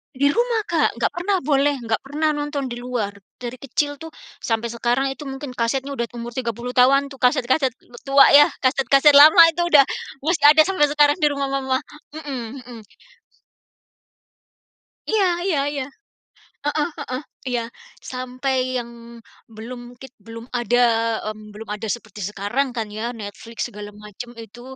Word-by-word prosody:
Di 280 +2 +2
rumah 470 +9 +1
Kak! 325 -3 +2
Nggak - - +1
pernah 380 +3 0
boleh 285 0 +1
nggak 220 -1 0
pernah 300 +2 -1
nonton 290 -2 -3
di 240 - -6
luar, 240 -4 -4 0.2
dari 245 0 -6
kecil 290 +3 -2
tuh 320 +3 -10 0.3
sampai 225 0 -1
sekarang 240 +3 0
itu 270 +2 -6
mungkin 270 -1 -7
kasetnya 270 +4 -2
udah 235 - -1 0.2
umur 235 0 -7
30 240 0 -4
tahunan 275 +3 +4
tuh 275 - -11
kaset-kaset 255 +1 +2 0.3
tua 275 0 +6
ya, 290 - +10 0.2
kaset-kaset 275 +2 +4
lama 305 +5 +9
itu 330 +1 0
udah 285 -2 +8 0.4
musti 320 +5 -1
ada 300 +2 +8
sampai 370 -6 +3
sekarang 295 -1 +4
di 305 -3 +2
rumah 280 -1 -2
mama. 265 -1 -1 0.3
Mhm 275 -5 -6
mhm. 240 -2 -11 2.3
iya 435 -2 +2 0.2
iya 340 -7 +1
iya. 280 -2 -3 0.8
Heeh 295 - 0
heeh, 305 +2 0 0.6
iya. 245 -1 0 0.5
Sampai 255 +1 -3 0.2
yang 235 -1 -5 0.6
belum 240 +3 -8 0.2
tip 265 0 -12
belum 230 +2 -10
ada, 245 0 0 0.6
mmm, 215 0 -14
belum 215 +2 -9
ada 210 +1 -5
seperti 215 -3 -12
sekarang 210 +7 -1
kan 220 - -2
ya, 215 +1 -5 0.2
Netflix 215 +3 -9
segala 205 -1 -9
macam 210 +3 -9
itu, 230 +1 -11
265 Hz, 155 wpm, -21 LUFS, 235-290 Hz, 2.3 s, ya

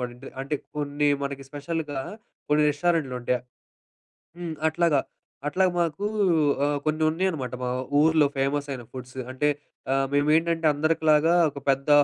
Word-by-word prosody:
కూడా 125 -1 -3
ఉంటది. 130 +2 -12
అంటే 140 +3 -2 0.2
కొన్ని 145 0 0 0.2
మనకి 140 0 -4
స్పెషల్‌గా 145 -1 -4 0.5
కొన్ని 150 0 +4
రెస్టారెంట్‌లు 155 -3 0
ఉంటాయి. 125 0 0 1.0
హ్మ్. 175 -2 -5 0.2
అట్లాగా, 160 -3 +2 0.5
అట్లాగా 185 +3 +2
మాకు 165 +4 -2 0.6
ఆహ్, 145 0 +1
కొన్ని 155 +1 0
ఉన్నయనమాట 160 -8 -2
మా 125 - -1 0.3
ఊర్లో 155 -1 +5
ఫేమస్ 140 +2 0
అయిన 125 - -6
ఫుడ్స్. 130 0 -9
అంటే 150 +3 +1 0.4
ఆహ్, 135 0 +2
మేమేంటంటే 160 +3 +2
అందరికి 155 +2 0
లాగా 155 +3 +5 0.2
ఒక 140 - -8
పెద్ద 135 +2 0
150 Hz, 140 wpm, -26 LUFS, 135-160 Hz, 1.0 s, ఊర్లో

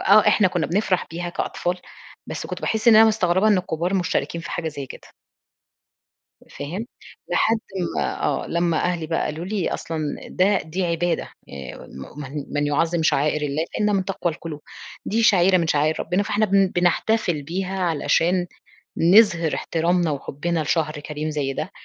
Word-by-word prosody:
آه، 210 +1 +7
إحنا 200 -4 +4
كنا 175 -4 -1
بنفرح 185 +3 0
بيها 175 +2 -4
كأطفال، 175 0 -2 0.5
بس - - -5
كنت - - -6
باحس 220 +1 +1
إن 225 - +8
أنا 220 - +9
مستغربة 210 -2 +3
إن 205 - +4
الكبار 175 +1 -2
مشتركين 175 -2 -1
في 165 - -8
حاجة 165 -2 -2
زي 140 -3 -6
كده. - - -12 1.5
فاهم، 185 +11 -4 0.5
لحد 225 0 +3 0.4
ما - - -2
آه - - 0
لمّا 170 -1 0
أهلي 170 -1 -1
بقى 165 - -1
قالوا 160 +3 -4
لي 190 -2 -1
أصلًا 160 -1 -5 0.3
ده 195 +3 +2
دي 180 +4 -2
عبادة 170 0 0
آآ، 70 -3 -10
"م 65 - -10
من 140 +1 -6
من 145 0 0
يعظم 165 +3 +1
شعائر 150 0 +1
الله 150 +2 -1
فإنها 210 0 +1
من 190 -1 +1
تقوى 180 -3 -2
القلوب"، 155 -1 -8 0.5
دي 225 +2 +1
شعيرة 190 -3 +5
من 170 - +1
شعائر 155 0 +1
ربنا، 180 +4 0
فإحنا 215 +1 +1
بن 195 0 +4
بنحتفل 175 -2 +1
بيها 185 +5 -3
علشان 175 +1 +1 0.5
نظهِر 170 -3 +5
احترامنا 170 0 0
وحبنا 150 +4 -2
لشهر 155 0 0
كريم 150 +1 -4
زي 145 -3 -2
ده، - - -4
175 Hz, 165 wpm, -23 LUFS, 155-190 Hz, 1.5 s, أنا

